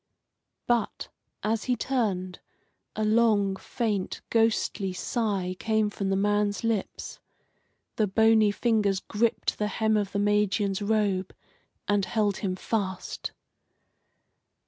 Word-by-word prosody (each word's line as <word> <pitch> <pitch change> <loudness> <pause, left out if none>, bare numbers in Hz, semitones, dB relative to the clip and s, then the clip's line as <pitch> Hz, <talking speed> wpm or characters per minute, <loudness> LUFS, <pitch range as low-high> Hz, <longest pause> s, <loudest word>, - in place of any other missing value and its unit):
But, 240 -2 0 0.3
as 215 0 0
he 250 - +1
turned, 200 -8 -1 0.6
a 215 - 0
long, 215 -3 +3
faint, 205 -1 -3
ghostly 225 -4 +1
sigh 195 -3 -1
came 220 -1 +1
from 200 -1 -3
the 195 - +2
man's 205 +1 +1
lips. 225 -4 -2 0.8
The 215 - +2
bony 220 +1 +4
fingers 205 -3 +1
gripped 220 +3 -1
the 210 - +1
hem 220 +1 +1
of 205 -2 -1
the - - -2
Magian's 205 -1 +1
robe 205 -3 0 0.5
and 205 -1 +2
held 210 -3 0
him 185 -3 -2
fast. 190 -2 -3
210 Hz, 115 wpm, -27 LUFS, 195-220 Hz, 0.8 s, bony